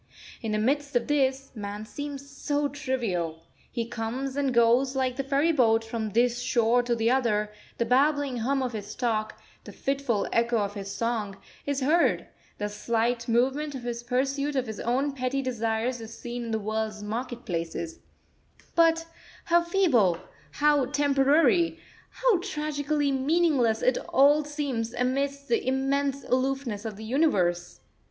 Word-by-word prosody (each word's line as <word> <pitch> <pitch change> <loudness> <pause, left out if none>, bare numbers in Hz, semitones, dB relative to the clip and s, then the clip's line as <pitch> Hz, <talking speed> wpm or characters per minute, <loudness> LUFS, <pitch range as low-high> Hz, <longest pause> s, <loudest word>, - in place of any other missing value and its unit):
In 225 - -3
the - - +1
midst 280 +5 0
of 240 - +2
this, 270 -2 0
man 205 -1 -6
seems 280 +4 -6
so 290 +1 -1
trivial. 230 - -3 0.3
He 235 -2 -2
comes 245 +4 -4
and 280 -2 +1
goes, 245 +3 +3
like 260 -1 0
the 275 - -2
ferry 280 +4 +2
boat, 225 -6 +3
from 225 -1 -3
this 240 +3 +2
shore 235 0 +3
to 240 -1 0
the 230 +1 +2
other; 215 -5 +1 0.3
the 235 - +1
babbling 280 +1 +2
hum 265 +4 0
of 250 -2 -3
his 210 -1 -6
talk, 220 -3 -1 0.3
the - - -10
fitful 275 -6 -1
echo 235 0 +2
of 205 -1 -1
his 200 -1 -6
song, 215 -2 -2 0.3
is 285 -1 -1
heard; 315 +6 +3 0.3
the 210 - -2
slight 230 +2 -1
movement 270 +5 +1
of 255 - -6
his 240 -1 -4
pursuit 275 +4 -1
of 260 -2 +1
his 220 -2 -6
own 265 +5 0
petty 270 0 -2
desires 230 0 -1
is 225 0 -9
seen 240 0 -5
in - - -5
the 220 - +1
world's 215 0 -3
market 240 +3 -4
places: 165 -1 -4 0.7
but 330 -1 +4 0.4
how 345 0 +4
feeble, 325 - +3 0.4
how 295 -3 +3
temporary, 290 +5 +3 0.3
how - - +2
tragically 300 -5 -1
meaningless 270 -5 +2
it 255 - +3
all 290 +3 +5
seems 280 -6 -3
amidst 275 +3 -1
the 235 +1 0
immense 275 +1 0
aloofness 255 -4 -1
of 220 -2 -4
the 220 - -8
Universe! 190 - +1
255 Hz, 155 wpm, -27 LUFS, 225-280 Hz, 0.7 s, all